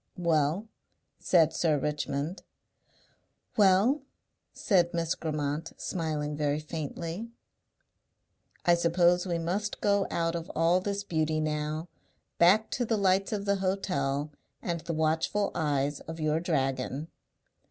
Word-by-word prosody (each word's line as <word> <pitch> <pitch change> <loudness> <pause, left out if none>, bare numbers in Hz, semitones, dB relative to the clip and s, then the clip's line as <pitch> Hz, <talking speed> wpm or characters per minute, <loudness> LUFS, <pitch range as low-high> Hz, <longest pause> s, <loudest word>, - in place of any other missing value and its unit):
"Well?" 170 +3 +1 0.5
said 165 -3 +4
Sir 155 -3 +2
Richmond. 150 +3 -2 1.1
"Well?" 205 +8 +4 0.5
said 175 -5 +2
Miss 165 -1 0
Grammont 150 0 -3
smiling 150 -4 -2
very 145 0 0
faintly. 165 +6 -5 1.4
"I 175 - +6
suppose 175 +1 +3
we 170 -1 0
must 185 +6 -2
go 200 -1 +2
out 165 -1 0
of 165 -1 -5
all 165 +3 +4
this 200 +1 -3
beauty 155 -4 0
now, 155 +1 -2 0.5
back 200 +6 +5
to 245 - 0
the 225 -1 0
lights 195 -1 +2
of 205 -2 -2
the 200 0 +2
hotel 155 -7 -1 0.3
and 170 -1 -2
the 165 - -4
watchful 160 +6 +1
eyes 145 -2 0
of 165 0 -8
your 155 0 +1
dragon." 135 -2 -1
165 Hz, 120 wpm, -29 LUFS, 150-185 Hz, 1.4 s, I